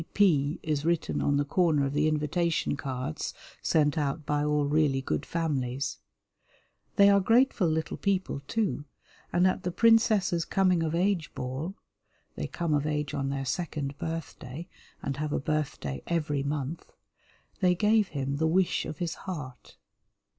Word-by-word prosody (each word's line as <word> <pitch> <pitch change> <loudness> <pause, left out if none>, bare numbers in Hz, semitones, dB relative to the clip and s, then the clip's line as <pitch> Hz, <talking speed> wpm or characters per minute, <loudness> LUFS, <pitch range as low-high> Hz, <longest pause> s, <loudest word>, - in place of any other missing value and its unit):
"P. - - -6
P." 155 -8 +3
is 150 -2 -1
written 170 0 0
on 145 0 +2
the 145 - +1
corner 155 -3 +2
of 135 - -2
the 150 +1 +2
invitation 155 +2 0
cards 130 - -4 0.3
sent 150 0 +2
out 145 +1 -2
by 145 0 +1
all 150 -1 +2
really 145 -2 +2
good 80 - -2
families. 140 -5 -2 1.0
They 200 - +7
are 200 0 +6
grateful 225 -1 +3
little 160 0 -1
people, 190 -7 0
too, 205 -10 -1 0.5
and 175 +1 +3
at 185 - +2
the 180 - -2
princess's 215 -3 +4
coming 185 -2 +2
of 160 0 0
age 180 -2 +1
ball 135 +9 -4 0.6
(they - - -3
come 170 -3 -2
of 145 0 +1
age 150 -2 -1
on 135 -2 -1
their 135 0 -2
second 145 -1 -3
birthday 160 -1 -5 0.4
and 140 0 -2
have 150 0 -2
a - - +1
birthday 140 - -2
every 150 -4 0
month) 145 +2 -4 0.7
they 180 -2 +3
gave 210 +2 +3
him 140 -3 -3
the 160 +2 +2
wish 180 +3 +2
of 150 - -6
his 170 0 -2 0.2
heart. 130 -8 -7
155 Hz, 160 wpm, -28 LUFS, 140-175 Hz, 1.0 s, They